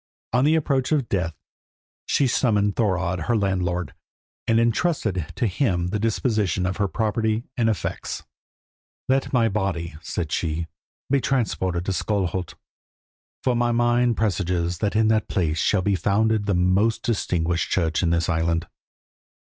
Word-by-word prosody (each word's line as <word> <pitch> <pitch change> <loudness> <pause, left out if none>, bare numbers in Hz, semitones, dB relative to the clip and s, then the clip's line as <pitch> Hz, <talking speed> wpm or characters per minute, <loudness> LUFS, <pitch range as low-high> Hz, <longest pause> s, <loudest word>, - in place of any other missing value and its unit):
On 125 +2 +3
the 155 +2 +4
approach 140 -4 0
of 145 -6 +1
death 85 -5 -1 0.7
she 140 - +2
summoned 105 -5 +2
Thorodd, 95 -5 0
her 120 - +2
landlord, 90 -5 -1 0.5
and 115 0 +4
intrusted 115 - 0
to - - 0
him 90 -5 0
the 105 +3 -1
disposition 105 -5 0
of 90 +1 -2
her 100 -1 +1
property 110 +2 0
and 115 -4 +2
effects. 105 - -3 0.8
"Let 135 +1 +1
my 120 -3 +3
body," 95 -6 -2
said 80 -2 -4
she, 80 0 -1 0.5
"be 140 -1 +3
transported 95 -10 0
to 95 - -1
Skalholt, 95 -3 -1 0.9
for 125 -2 +2
my 120 0 +2
mind 120 0 +2
presages 90 -4 0
that 105 -1 -1
in 110 0 +4
that 110 -1 +2
place 80 -4 0
shall 95 -3 +2
be 100 - +2
founded 105 +3 +1
the 100 - +2
most 95 +5 +2
distinguished 90 -7 0
church 80 -3 +1
in 85 - +1
this 85 -1 +1
island. 85 0 0
100 Hz, 150 wpm, -24 LUFS, 90-115 Hz, 0.9 s, the